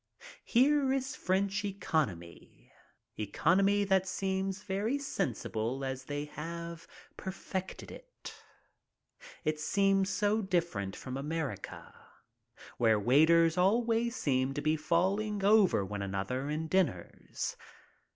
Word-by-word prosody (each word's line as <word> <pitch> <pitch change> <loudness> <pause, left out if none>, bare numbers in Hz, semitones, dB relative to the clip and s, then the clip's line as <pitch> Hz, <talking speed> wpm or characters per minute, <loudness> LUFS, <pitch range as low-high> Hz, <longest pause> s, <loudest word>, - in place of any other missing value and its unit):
Here 270 +2 +3
is 270 +1 -1
French 195 +2 0
economy 145 - -3 0.2
— - - -47
economy 190 - +2
that 190 -1 +2
seems 190 0 -2
very 210 +6 -1
sensible 125 - -2
as 130 0 -4
they 145 +1 -3
have 170 +2 -7 0.3
perfected 190 0 -5
it. - - -11 1.1
It 155 0 -1
seems 195 +3 +2
so 205 +3 +1
different 170 - -1
from 130 0 -6
America, 150 0 -5 0.9
where 110 -3 +4
waiters 160 - +4
always 230 +4 +2
seem 135 - 0
to 145 - -2
be 155 +1 +2
falling 195 +6 0
over 200 - +4
one 100 +1 -5
another 100 +8 -3
in 155 +2 -2
diners. 160 - -1
170 Hz, 110 wpm, -31 LUFS, 135-200 Hz, 1.1 s, where